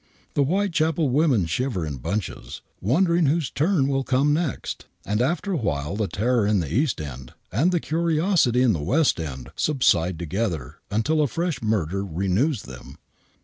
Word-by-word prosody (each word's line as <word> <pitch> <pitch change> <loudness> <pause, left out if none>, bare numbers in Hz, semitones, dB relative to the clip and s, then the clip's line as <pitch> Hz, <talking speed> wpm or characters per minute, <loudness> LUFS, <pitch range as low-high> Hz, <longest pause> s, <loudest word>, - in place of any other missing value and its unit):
the 145 - +3
Whitechapel 165 -2 +1
women 130 - +3
shiver 90 +2 -1
in 75 -3 -5
bunches, 95 - -4 0.2
wonder 170 - +2
ing 170 -3 +3
whose 150 -3 0
turn 155 -2 +2
will 135 -1 0
come 135 +3 +2
next, 160 -2 -3 0.2
and 105 +3 0
after 175 +9 0
a 180 - +1
while 75 - -2
the 105 -1 -1
terror 115 +2 +1
in 105 -1 +2
the 80 -4 -3
East 140 +3 +1
End 65 -4 -8 0.2
and 145 - +2
the 175 - +2
curiosity 160 - +2
in 120 -4 +4
the 80 - -2
West 140 - +2
End 65 -4 -6
subside 90 - +2
together 85 - -3
until 145 +10 +1
a 150 - +3
fresh 170 +4 -2
murder 100 -4 0
renews 100 - 0
them. 65 +1 -11
125 Hz, 170 wpm, -24 LUFS, -, 0.2 s, in